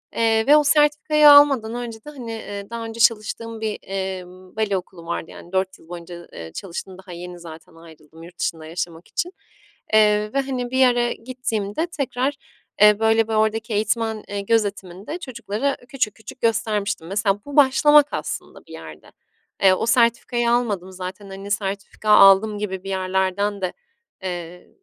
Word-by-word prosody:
Eee, 225 -1 +2
ve 295 +2 +8
o 300 - +4
sertifikayı 300 0 +4
almadan 275 -6 +6
önce 240 -2 -5
de, - - -8
hani, 250 -6 -8
eee, 205 -2 -7
daha 230 0 -5
önce 225 +1 -8
çalıştığım 225 0 +1
bir, 215 -1 -3
emm, 185 -1 -6
bale 215 -3 0
okulu 180 -2 -10
vardı. 170 -1 -4
Yani, 175 - -13
4 190 0 -1
yıl 160 - -20
boyunca, 175 0 -9
eee, 80 -1 -8
çalıştım, 185 - -7
daha 190 -1 -13
yeni 175 +1 -8
zaten 165 -1 -12
ayrıldım 160 -1 -16
yurt 175 +1 -14
dışında 160 -2 -3
yaşamak 165 +1 -6
için. 345 +2 -3 0.6
Eee, 210 0 +3
ve, 275 - +1
hani, 255 -2 -4
bir 260 - -1
yere 245 -2 +3
gittiğimde 235 - -3
tekrar, 275 -3 -2 0.5
eee, 210 0 +7
böyle, 225 0 +3
bir 225 - -3
oradaki 220 +1 0
eğitmen, 220 +1 -1
eee, 200 0 -4
gözetiminde 200 - -2
çocuklara 260 - -3
küçük 245 -4 -3
küçük 220 +3 -12
göstermiştim. 210 -5 -1
Mesela 200 +1 0
bu 285 - -8
başlamak 295 +1 +6
aslında - - -6
bir - - -17
yerde. - - -11 0.5
Eee, 190 -1 +7
o 185 - -1
sertifikayı 235 0 +2
almadım 205 -7 0
zaten, 185 +2 -8
hani, 195 +1 -8
sertifika 200 +1 -3
aldım 205 +1 +7
gibi 190 -3 -4
bir 195 - -7
yerlerden 190 +1 -1
de, 185 - -2 0.5
eee, 175 -1 -6
210 Hz, 165 wpm, -22 LUFS, 190-235 Hz, 0.6 s, ve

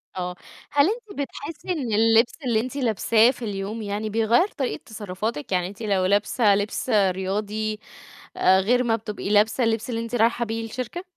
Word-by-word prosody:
آه، 180 -1 -4 0.4
هل 285 0 +4
أنتِ 435 -6 -6
بتحسي 295 +5 -6
إن 265 -10 -2
اللبس 225 +2 +4
اللي 230 -3 +2
أنتِ 255 +4 -4
لابساه 230 -1 +3
في 245 - -8
اليوم 205 +2 -4
يعني 210 +1 -3
بيغير 225 - +3
طريقة 275 -10 -4
تصرفاتِك؟ 205 -5 -5
يعني 180 -1 +1
أنتِ 200 +4 -11
لو 195 -4 +1
لابسة 205 +2 +3
لبس 205 +5 -2
رياضي، 210 +1 0 0.6
آآ، 190 +1 +5
غير 245 +6 +2
ما 230 -2 +2
بتبقي 210 -2 -5
لابسة 215 +4 +3
اللبس 225 0 0
اللي 230 -1 -2
أنتِ 230 +1 -4
رايحة 235 +1 +2
بيه 225 +1 -3
الشركة؟ 255 +10 -5
220 Hz, 170 wpm, -24 LUFS, 205-240 Hz, 0.6 s, آآ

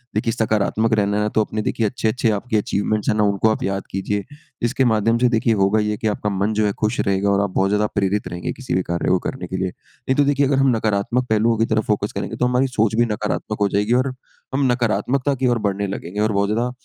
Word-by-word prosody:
देखिए 110 +1 0
सकारात्मक 110 0 +1
रहना 105 -1 +1
है 105 - +1
ना 105 - 0
तो 110 - +4
अपने 110 0 -4
देखिए 110 +1 -1
अच्छे-अच्छे 115 0 0
आपके 110 +2 -1
अचीवमेंट्स 105 +1 -1
हैं - - +2
ना 105 - +3
उनको 100 +2 +2
आप 110 - -1
याद 95 0 -2
कीजिए 100 +1 -2 0.4
इसके 125 +2 +1
माध्यम 115 0 +2
से 125 0 +3
देखिए 115 -1 +2
होगा 100 +1 +2
ये 105 0 -1
कि 110 - -2
आपका 105 0 -1
मन 100 +2 0
जो 110 0 +1
है 105 - +2
खुश 110 +2 0
रहेगा 100 +1 +1
और 100 0 +3
आप 100 - 0
बहुत 95 0 +2
ज़्यादा 105 +1 +2
प्रेरित 100 0 0
रहेंगे 90 0 -4
किसी 130 -2 -5
भी 95 - +2
कार्य 85 0 -2
को 95 - +3
करने 90 -9 -5
के 95 - -4
लिए। 95 0 -1
नहीं 130 - -6
तो 145 - +5
देखिए 140 0 +2
अगर 135 -1 +1
हम 135 -3 +3
नकारात्मक 110 +3 0
पहलुओं 110 +1 +2
की 115 - +2
तरफ़ 110 -1 0
फ़ोकस 105 -1 0
करेंगे 100 - -4
तो 125 - 0
हमारी 125 +2 +2
सोच 110 -3 0
भी 120 +1 +3
नकारात्मक 105 0 -3
हो 100 - +4
जाएगी 105 +4 +1
और 135 -1 -4 0.4
हम 135 +1 +1
नकारात्मकता 125 +4 0
की 130 0 0
ओर 120 -1 +2
बढ़ने 100 +1 -1
लगेंगे। 95 +1 -5
और 110 0 +2
बहुत 100 0 +1
ज़्यादा 120 +3 0
105 Hz, 255 wpm, -21 LUFS, 100-120 Hz, 0.4 s, तो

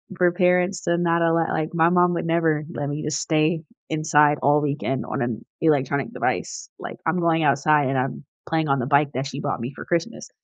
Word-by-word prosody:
for 175 0 +3
parents 180 0 +1
to 170 0 +1
not 170 -1 +1
allow 165 0 +2
like, 155 +2 -2
my 165 0 +3
mom 175 0 +3
would 170 - -2
never 165 -2 +1
let 145 - -3
me 145 +1 -4
just 150 - -2
stay 160 +1 +1 0.3
inside 150 -1 +3
all 145 +1 +3
weekend 140 -2 -2
on - - -4
an 120 -2 -3 0.2
electronic 140 -3 +1
device. - - -3
Like, - - -7
I'm 165 +3 +1
going 165 -2 +2
outside 145 0 +3
and 135 - 0
I'm 130 +3 -3 0.2
playing 160 -1 0
on 135 0 +2
the 120 - -1
bike 140 +1 +2
that 135 +2 -3
she 140 0 -6
bought 140 -3 -2
me 120 +4 -5
for - - -8
Christmas, 170 -1 -3
155 Hz, 215 wpm, -23 LUFS, 140-170 Hz, 0.3 s, for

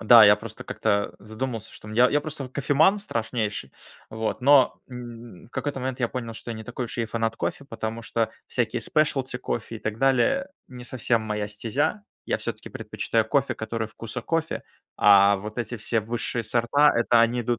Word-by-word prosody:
Да, 115 0 +9
я 105 0 +7
просто 110 +1 -9
как-то 100 -2 0
задумался, 110 +1 -5
что, 105 - -12
м, 110 - -7
я 125 +2 +5
я 145 - +3
просто 155 -2 -6
вот 130 - -11
кофеман 155 +8 +3
страшнейший. 110 - -3 0.4
Вот, 110 +2 -3
но, 140 -1 +5
м, 120 -5 -9
в - - -24
какой-то 140 0 -3
момент 130 0 -3
я 120 - +2
понял, 115 -3 -5
что 120 - -8
я 115 - -4
не 110 - -8
такой 125 +1 -4
уж 120 - -6
и 115 - 0
фанат 115 0 -1
кофе. 140 - -3
Потому 115 -2 -5
что 115 -1 -1 0.2
всякие 120 -3 -1
specialty 135 -5 +1
кофе 115 -2 -4
и - - -10
так 110 +1 -4
далее- 135 - +3 0.2
не 125 -1 -9
совсем 120 -2 0
моя 105 -1 -2
стезя. 120 - -1 0.2
Я - - +1
всё-таки - - -6
предпочитаю 115 -1 -1
кофе, 135 +4 +1
который 110 0 -3
вкуса 115 +2 -7
кофе, 165 +5 -1 0.3
а 100 0 +7
вот 105 +3 -7
эти 120 +1 -3
все 115 +1 0
высшие 115 +2 -2
сорта- 120 +7 +4
это 120 0 +4
они 120 +1 +3
идут 120 0 -1
115 Hz, 195 wpm, -25 LUFS, 110-130 Hz, 0.4 s, Да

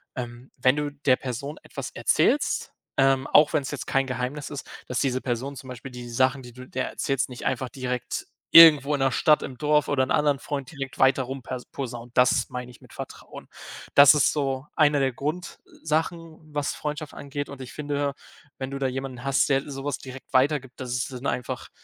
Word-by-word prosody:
ähm, 120 0 -7
wenn 130 +2 +4
du 150 -1 -2
der 140 -2 +2
Person 135 +4 -5
etwas - - -6
erzählst, - - +1 0.2
ähm, 135 0 +3
auch 150 +1 +5
wenn 150 -3 +2
es 135 - -5
jetzt 145 - -5
kein 135 0 +1
Geheimnis 130 +3 -3
ist, 145 -2 -7 0.2
dass 125 - -1
diese 130 -2 0
Person 130 +3 -3
zum 130 0 -10
Beispiel 125 +2 -8
die 120 -1 -8
Sachen, 130 +3 +2
die 120 - -11
du 130 +1 -11
der 130 0 -3
erzählst, 135 -2 -1
nicht 125 -2 -8
einfach 130 0 -1
direkt 125 -2 -4 0.3
irgendwo 150 -4 +9
in 145 - 0
der 135 -1 +2
Stadt 155 -3 +4
im 130 - -7
Dorf 150 +1 +2
oder 130 -2 +2
'n 130 - -3
anderen 145 -2 +2
Freund 140 -3 -4
direkt 135 -3 -7
weiter 135 0 +4
rum 135 +1 -6
per 125 +1 -5
posaunt. 120 -3 -6
Das 125 -1 +4
meine 125 0 -6
ich 120 - -16
mit - - -17
Vertrauen. - - -9 0.5
Das 140 +1 +9
ist 145 -3 +3
so 135 -2 -1
eine 145 -2 +4
der 135 -2 +1
Grundsachen, 160 +2 -3 0.2
was 145 -1 -1
Freundschaft 150 0 -5
angeht 145 0 -5
und 140 -2 -9
ich 125 - -8
finde, 145 -1 -2 0.4
wenn 130 0 -4
du 140 - -5
da 135 - +1
jemanden 130 -1 -5
hast, 135 -1 +2
der 135 +1 +1
sowas 140 +1 -4
direkt 130 0 -11
weitergibt, 130 -1 +2
das 125 -1 -5
ist 125 +1 -2
dann 125 +2 -4
einfach, 125 - -3
135 Hz, 205 wpm, -25 LUFS, 130-145 Hz, 0.5 s, irgendwo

